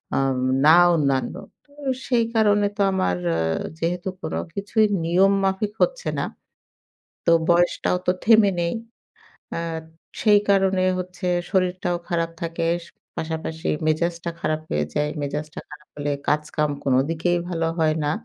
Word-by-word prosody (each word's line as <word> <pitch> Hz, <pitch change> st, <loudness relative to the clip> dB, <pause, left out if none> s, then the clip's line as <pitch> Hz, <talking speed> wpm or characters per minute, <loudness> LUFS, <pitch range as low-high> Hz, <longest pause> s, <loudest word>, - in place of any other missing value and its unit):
আম 135 Hz, -1 st, +1 dB, 0.3 s
না 160 Hz, -, +8 dB, 0.2 s
অন্যান্য। 140 Hz, -1 st, 0 dB, 0.3 s
তো 285 Hz, -, -29 dB, 0.4 s
সেই 235 Hz, -3 st, +2 dB
কারণে 205 Hz, -2 st, +4 dB
তো -, -, 0 dB
আমার 90 Hz, -, 0 dB, 0.6 s
যেহেতু 175 Hz, +3 st, -2 dB
কোন -, -, -4 dB, 0.2 s
কিছুই 210 Hz, +2 st, +2 dB, 0.2 s
নিয়ম 190 Hz, +4 st, +4 dB
মাফিক 195 Hz, +2 st, 0 dB
হচ্ছে -, -, -1 dB
না, -, -, 0 dB, 1.0 s
তো 170 Hz, -, +4 dB, 0.2 s
বয়সটাও 175 Hz, +1 st, +2 dB
তো 180 Hz, -, +6 dB
থেমে 220 Hz, -3 st, +6 dB
নেই। 170 Hz, -, 0 dB, 0.8 s
আ -, -, -2 dB, 0.6 s
সেই 210 Hz, -2 st, +6 dB
কারণে 190 Hz, -1 st, +3 dB, 0.2 s
হচ্ছে 180 Hz, +1 st, -5 dB, 0.2 s
শরীরটাও 180 Hz, -2 st, 0 dB
খারাপ 165 Hz, -1 st, 0 dB
থাকে, 165 Hz, 0 st, -2 dB, 0.5 s
পাশাপাশি 160 Hz, 0 st, -4 dB, 0.2 s
মেজাজটা 170 Hz, +2 st, 0 dB
খারাপ 155 Hz, 0 st, -1 dB
হয়ে 75 Hz, 0 st, +1 dB
যায়। 150 Hz, 0 st, 0 dB
মেজাজটা 150 Hz, +2 st, -4 dB
খারাপ 150 Hz, 0 st, -13 dB
হলে 145 Hz, 0 st, -2 dB, 0.2 s
কাজকাম 150 Hz, 0 st, 0 dB
কোনদিকেই 160 Hz, +7 st, +1 dB
ভালো 165 Hz, -2 st, -1 dB
হয় 155 Hz, -1 st, +2 dB
না। 145 Hz, -, +1 dB
170 Hz, 130 wpm, -23 LUFS, 155-190 Hz, 1.0 s, না